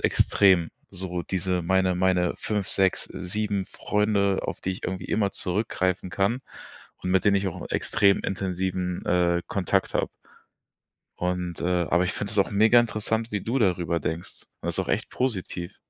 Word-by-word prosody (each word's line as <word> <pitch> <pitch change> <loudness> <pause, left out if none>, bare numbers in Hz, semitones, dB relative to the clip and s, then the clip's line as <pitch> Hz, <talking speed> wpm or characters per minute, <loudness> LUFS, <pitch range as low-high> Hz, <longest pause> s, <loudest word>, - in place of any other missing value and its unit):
extrem, 95 -5 +4 0.2
so 90 -2 -4
diese 90 -1 -1
meine 95 +1 +2
meine 90 -1 +2
5, 105 -3 -2
6, 95 -1 +2
7 100 0 -2
Freunde, 105 -2 +1
auf - - -4
die 95 - -2
ich 95 - -6
irgendwie 95 -1 -3
immer 105 -2 +1
zurückgreifen 95 -1 -1
kann 100 +7 0 0.6
und 90 - -2
mit 95 +2 +3
denen 100 -1 +5
ich 95 0 0
auch 80 - -7
'n - - -7
extrem 100 -1 +3
intensiven, 95 -1 -2
äh, 85 -1 +2
Kontakt 95 -3 0
habe. - - +1 1.1
Und, 90 -1 -2
äh 90 -1 +1
aber 85 +2 +3
ich 90 - -1
finde 100 - -4
das - - -1
auch 100 - +3
mega 110 +4 +5
interessant, 110 0 0
wie 105 - 0
du 120 +4 0
darüber 90 -6 +1
denkst. 80 +2 -5 0.2
Das - - -2
ist - - -3
auch - - -1
echt - - 0
positiv. 95 -8 -3
95 Hz, 170 wpm, -26 LUFS, 90-100 Hz, 1.1 s, denen